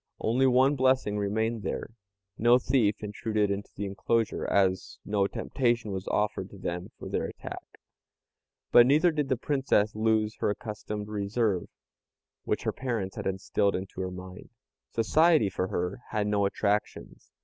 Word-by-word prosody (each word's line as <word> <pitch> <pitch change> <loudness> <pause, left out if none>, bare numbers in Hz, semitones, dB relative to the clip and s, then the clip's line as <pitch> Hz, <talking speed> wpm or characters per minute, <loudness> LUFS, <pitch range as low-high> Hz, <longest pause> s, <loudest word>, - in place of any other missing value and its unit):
Only 125 +4 +2
one 130 +3 +4
blessing 130 -6 +2
remained 110 +3 -1
there 100 - -4 0.4
no 120 +3 +5
thief 120 -5 +1
intruded 105 0 -1
into 100 +1 -4
the 100 - -3
enclosure, 110 +3 -1
as 95 -2 +1
no 100 -1 +1
temptation 120 -1 -1
was 95 0 -5
offered 105 -2 -1
to 100 - -12
them 90 -1 -4
for - - -8
their - - -1
attack. - - -9 0.9
But 120 0 +8
never 155 +6 +4
did 150 -3 -2
the 130 - +1
Princess 130 -6 +1
lose 110 0 +1
her - - 0
accustomed 105 -1 -5
reserve, 105 -2 -1 0.8
which - - -1
her - - -1
parents 115 -7 -3
had - - -4
instilled 100 +1 0
into 95 0 -5
her 95 - -2
mind. 90 +2 -10 0.4
Society 150 - +3
for 95 - -1
her 90 +3 -2
had 105 -2 0
no 105 -1 +2
attractions. 105 +1 -2
105 Hz, 150 wpm, -28 LUFS, 100-120 Hz, 0.9 s, But